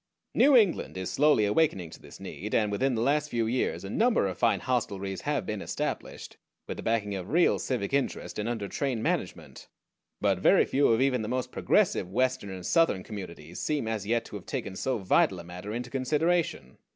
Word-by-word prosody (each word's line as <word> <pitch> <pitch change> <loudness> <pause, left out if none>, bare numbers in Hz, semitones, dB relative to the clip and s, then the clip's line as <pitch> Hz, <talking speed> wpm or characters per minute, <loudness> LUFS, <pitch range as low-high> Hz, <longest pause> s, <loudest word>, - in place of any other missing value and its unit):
New 275 -2 +6
England 195 - +2
is 95 -1 -3
slowly 145 -3 +4
awakening 100 - +1
to - - -12
this - - -13
need, 105 +3 -5
and 105 -2 +2
within 130 +5 +1
the 115 - 0
last 150 +3 +1
few 115 -3 0
years 120 +3 -1
a 95 - -6
number 230 - +2
of 95 -2 -2
fine - - +2
hostelries 100 -6 -2
have - - -1
been - - -4
established, - - -5 0.3
with - - -5
the - - -5
backing 110 -3 0
of 95 -1 -5
real 170 +3 +3
civic 125 -3 -2
interest, 140 -5 -1
and 105 +2 -2
under 110 -4 -3
trained 125 -1 -2
management; - - -3 0.5
but 100 -3 +1
very 185 - +5
few 140 +1 +2
of 115 +1 +3
even 130 -3 +2
the 110 - -4
most 125 +1 -2
progressive 90 - +1
Western 130 0 0
and 95 -2 -7
Southern 165 - +2
Communities 90 -6 -8
seem 145 -7 -1
as 110 -3 -3
yet 115 +1 +1
to - - -9
have 100 - -9
taken 95 - -4
so 130 +5 -1
vital 95 -2 +2
a - - -8
matter 90 +4 -8
into 120 +2 -5
consideration. 150 - 0
115 Hz, 200 wpm, -28 LUFS, 100-135 Hz, 0.5 s, New